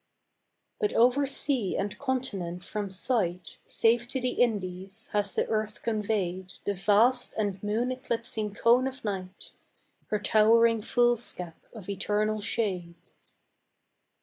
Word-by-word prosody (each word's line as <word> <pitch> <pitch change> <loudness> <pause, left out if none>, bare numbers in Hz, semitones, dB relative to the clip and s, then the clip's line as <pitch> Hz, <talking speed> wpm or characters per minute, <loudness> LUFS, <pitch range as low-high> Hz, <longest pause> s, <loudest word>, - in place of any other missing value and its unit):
But 420 -3 0
over 255 +4 +4
sea 260 -7 -1
and 200 0 -2
continent 200 -11 -2
from 205 +1 -4
sight 185 -4 -2
Safe 235 +1 +2
to 260 +1 -2
the 250 0 0
Indies 195 -3 -2
has 205 -1 0
the - - +2
earth 215 -1 -2
conveyed 200 -4 -1
The 205 - +1
vast 215 +6 +3
and 200 -3 -1
moon 220 +5 0
eclipsing 230 -4 -3
cone 240 +4 +4
of 265 -2 -7
night, 190 -2 -5 0.6
Her 210 - 0
towering 225 +2 +4
foolscap 240 -8 0
of 215 -6 -10
eternal 210 +2 0
shade. 185 -6 -1
215 Hz, 120 wpm, -28 LUFS, 195-240 Hz, 0.6 s, over